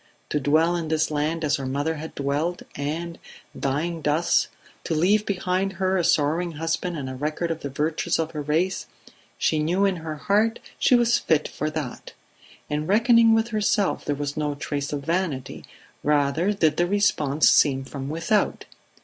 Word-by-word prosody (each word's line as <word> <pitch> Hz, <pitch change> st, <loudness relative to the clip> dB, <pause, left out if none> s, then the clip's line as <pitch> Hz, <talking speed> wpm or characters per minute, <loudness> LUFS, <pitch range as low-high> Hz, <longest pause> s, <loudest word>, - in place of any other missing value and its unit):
To 150 Hz, -, 0 dB
dwell 160 Hz, +5 st, +3 dB
in 170 Hz, -2 st, -3 dB
this 155 Hz, 0 st, 0 dB
land 155 Hz, +2 st, -1 dB
as 150 Hz, 0 st, +1 dB
her 135 Hz, -, -5 dB
mother 145 Hz, +4 st, -1 dB
had 160 Hz, +2 st, -8 dB
dwelt, 145 Hz, +5 st, -1 dB
and, 165 Hz, +4 st, -4 dB, 0.4 s
dying 155 Hz, +5 st, -2 dB
thus, 155 Hz, +3 st, +2 dB, 0.4 s
to 165 Hz, -, -2 dB
leave 200 Hz, +7 st, +2 dB
behind 190 Hz, 0 st, -1 dB
her 190 Hz, 0 st, 0 dB
a 180 Hz, -, +1 dB
sorrowing 165 Hz, +3 st, +1 dB
husband 165 Hz, +2 st, -2 dB
and 135 Hz, -3 st, -4 dB
a 130 Hz, -, -5 dB
record 155 Hz, +5 st, -2 dB
of 165 Hz, -, -3 dB
the 140 Hz, -, -5 dB
virtues 155 Hz, +5 st, -1 dB
of 160 Hz, -1 st, -2 dB
her 150 Hz, -, -4 dB
race, 160 Hz, +6 st, -1 dB, 0.5 s
she 155 Hz, -, +1 dB
knew 175 Hz, +6 st, +1 dB
in 195 Hz, -2 st, +1 dB
her 160 Hz, -1 st, -5 dB
heart 210 Hz, +8 st, +1 dB, 0.2 s
she 250 Hz, -, +5 dB
was 240 Hz, -1 st, +3 dB
fit 155 Hz, -2 st, +1 dB
for 155 Hz, -, -3 dB
that. 150 Hz, -5 st, -6 dB, 0.5 s
In 150 Hz, +1 st, -2 dB
reckoning 230 Hz, +2 st, +5 dB
with 225 Hz, +1 st, +1 dB
herself 210 Hz, -2 st, +1 dB
there 145 Hz, -, -1 dB
was 145 Hz, 0 st, -4 dB
no 150 Hz, -1 st, -1 dB
trace 145 Hz, -1 st, -4 dB
of 140 Hz, -1 st, -4 dB
vanity; 165 Hz, -6 st, -2 dB, 0.4 s
rather 150 Hz, +5 st, +2 dB
did 165 Hz, -7 st, +1 dB
the 175 Hz, -, +2 dB
response 160 Hz, -7 st, +2 dB
seem 135 Hz, -2 st, +4 dB
from 135 Hz, 0 st, -6 dB
without. 165 Hz, +7 st, 0 dB
160 Hz, 175 wpm, -24 LUFS, 145-180 Hz, 0.5 s, she